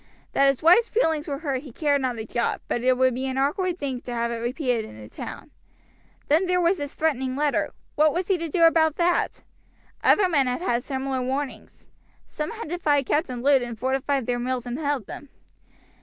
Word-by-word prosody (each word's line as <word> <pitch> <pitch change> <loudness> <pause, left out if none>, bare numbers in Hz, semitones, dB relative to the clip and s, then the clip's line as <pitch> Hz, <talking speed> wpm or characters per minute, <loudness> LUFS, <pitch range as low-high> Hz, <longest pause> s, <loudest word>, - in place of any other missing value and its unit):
That 275 - +4
his 275 0 +1
wife's 360 +9 +6
feelings 320 -9 +1
were 280 -2 -2
hurt 275 -4 -2
he 280 -3 -11
cared 285 +2 +1
not 250 -2 -1
a 220 - -5
jot, 235 +1 -1
but 240 - -1
it 255 0 +3
would 260 0 +3
be 260 +2 -3
an 260 0 -3
awkward 345 +6 0
thing 270 -6 -4
to 245 - -6
have 235 0 -1
it 235 - -3
repeated 245 0 -1
in 110 - -11
the 105 - -10
town. - - -9 0.8
Then 325 +6 +3
there 360 0 +2
was 355 +2 +2
this 285 -1 -5
threatening 265 -5 0
letter; 295 0 +1 0.2
what 305 +1 +4
was 355 +3 -2
he 380 -3 +1
to 330 0 -4
do 335 +2 +2
about 320 -2 +5
that? 350 0 0 0.6
Other 405 -3 +5
men 285 -7 +2
had 250 +5 -2
had 240 -9 0
similar 265 -1 -2
warnings. 265 +2 -4 0.4
Some 300 +1 -5
had 460 -4 -7
defied 295 -5 +1
Captain 255 -5 -1
Lud, 275 -1 +5
and 240 -2 -5
fortified 265 +1 0
their 245 0 -1
mills 250 0 -2
and 245 +3 -4
held 285 -7 -1
them. 285 - -9
275 Hz, 210 wpm, -25 LUFS, 250-320 Hz, 0.8 s, wife's